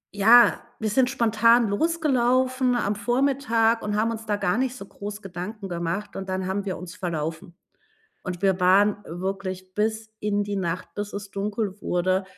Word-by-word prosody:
ja, 230 +4 +6 0.2
wir 215 -2 -2
sind 255 +2 +3
spontan 230 -2 +3
losgelaufen 255 -2 +1
am 210 -4 0
Vormittag 240 -1 +1
und 210 0 -2
haben 225 +2 +1
uns 225 -1 -7
da 205 - +1
gar 205 +3 0
nicht 260 -1 -1
so 200 - -9
groß 205 +1 -8
Gedanken 195 +3 -6
gemacht, 170 +4 -3
und 190 0 -6
dann 185 0 -2
haben 195 +2 -2
wir 190 - -3
uns 180 0 -9
verlaufen. 165 +1 -4 0.7
Und 180 -1 -5
wir 190 -2 +2
waren 200 +3 +4
wirklich 185 +1 -5
bis 220 +1 -1
in 205 -1 0
die 205 0 -3
Nacht, 180 -2 -3
bis 205 0 -4
es 200 0 -6
dunkel 205 0 -3
wurde, 185 +2 0
205 Hz, 170 wpm, -25 LUFS, 190-230 Hz, 0.7 s, ja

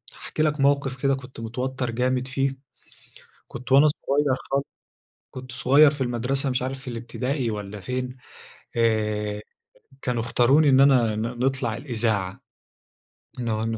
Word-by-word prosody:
هاحكي 155 - -3
لك 150 -1 0
موقف 140 -2 +1
كده 135 -1 +3
كنت 130 -2 -11
متوتر 125 +2 -3
جامد 125 +2 0
فيه، 135 0 -1 0.9
كنت 120 +1 -9
وأنا 140 +3 +7
صغير 145 -2 +1 0.2
خال 140 +1 +2 0.7
كنت 130 0 -9
صغير 140 +4 +5
في 145 -1 -7
المدرسة، 130 +3 0
مش 125 -1 0
عارف 130 +1 -5
الابتدائي 125 +2 -3
والّا 105 -1 -6
فين، 125 +3 -4 0.6
آآ، 105 -2 0 0.6
كانوا 120 -2 -1
اختاروني 130 +6 +4
إن 135 -1 +5
أنا 125 -6 +4
ن 110 - -2
نطلع 120 0 -1
الإذاعة، 110 -7 -2 1.0
إنه 110 -2 -1
إنه 115 0 -2
125 Hz, 135 wpm, -24 LUFS, 115-135 Hz, 1.0 s, وأنا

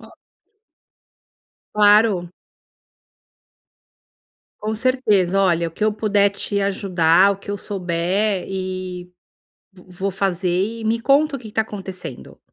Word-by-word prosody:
O - - -16 1.6
Claro. 205 -4 +4 2.3
Com 215 +1 -2
certeza, 210 -6 +1
olha 170 -3 +2
o - - -14
que 210 +6 -3
eu 215 - +2
puder 205 -2 +2
te 200 +1 -3
ajudar, 190 -2 +3
o - - -6
que 195 +1 -9
eu 205 - -2
souber, 185 +1 -1
e, 185 -1 -5 0.6
vo 180 -2 -18
vou 190 +2 -3
fazer 190 +3 -1
e - - -7
me 230 +1 +1
conta 280 +3 +3
o - - -6
que 235 - -11
que - - -18
tá 220 - +2
acontecendo? 190 - -8
195 Hz, 130 wpm, -21 LUFS, 180-215 Hz, 2.3 s, Claro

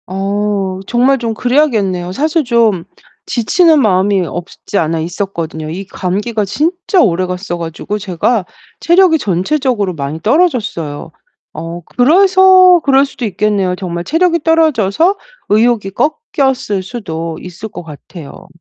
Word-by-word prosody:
어 195 0 -2
정말 255 +3 +2
좀 230 -2 -2
그래야겠네요. 220 -9 0
사실 310 - 0
좀 230 -8 +1 0.4
지치는 310 - +3
마음이 190 -3 +2
없지 175 +4 -6
않아 165 0 0
있었거든요. 165 -2 -4
이 185 +5 -6
감기가 205 +4 -2
진짜 345 - 0
오래갔어 180 -1 -1
가지고 170 +5 -5
제가 195 +2 -1 0.3
체력이 345 -1 +4
전체적으로 210 - -1
많이 145 0 -5
떨어졌어요. 220 - -1 0.4
어 170 +1 -7
그래서 370 +5 +5
그럴 275 0 +4
수도 270 -3 -6
있겠네요. 200 -2 0
정말 175 -2 -5
체력이 335 - +1
떨어져서 325 - +2 0.3
의욕이 215 -2 +2 0.4
꺾였을 260 -8 0
수도 165 -6 -6
있을 180 +5 -8
것 180 - -9
같아요. 155 0 -12
205 Hz, 300 characters per minute, -14 LUFS, 180-275 Hz, 0.4 s, 그래서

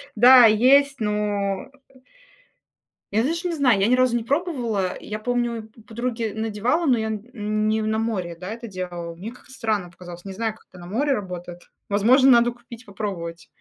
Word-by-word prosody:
Да, 245 +2 +8
есть, 270 +5 +4
но 205 -2 -1 1.4
Я, 220 +2 +2
даже 335 +5 -1
не 340 - -2
знаю, 255 -9 +3
я 195 - +3
ни 250 - +3
разу 255 -1 +3
не 230 - -4
пробовала. 240 - -1
Я 215 0 -6
помню, 235 -1 -2 0.2
подруге 230 -1 -3
надевала, 225 +9 -1
но 250 -3 +4
я 220 0 -2
н 215 -1 -3
не 220 0 +1
на 220 0 0
море, 185 -7 -2
да, 180 +3 -8
это 235 +1 -7
делала. 175 -3 -6
Мне 200 +7 -8
как-то 250 - -17
странно 215 -8 -2
показалось. 175 +1 -11
Не 195 - -6
знаю, 220 +1 -2
как - - -24
это 180 - -15
на 175 - -10
море 275 +8 0
работает. 180 -4 -6 0.3
Возможно, 250 +7 +5
надо 240 0 +5
купить, 240 -1 -14
попробовать. 180 -5 -6
220 Hz, 175 wpm, -23 LUFS, 200-245 Hz, 1.4 s, Да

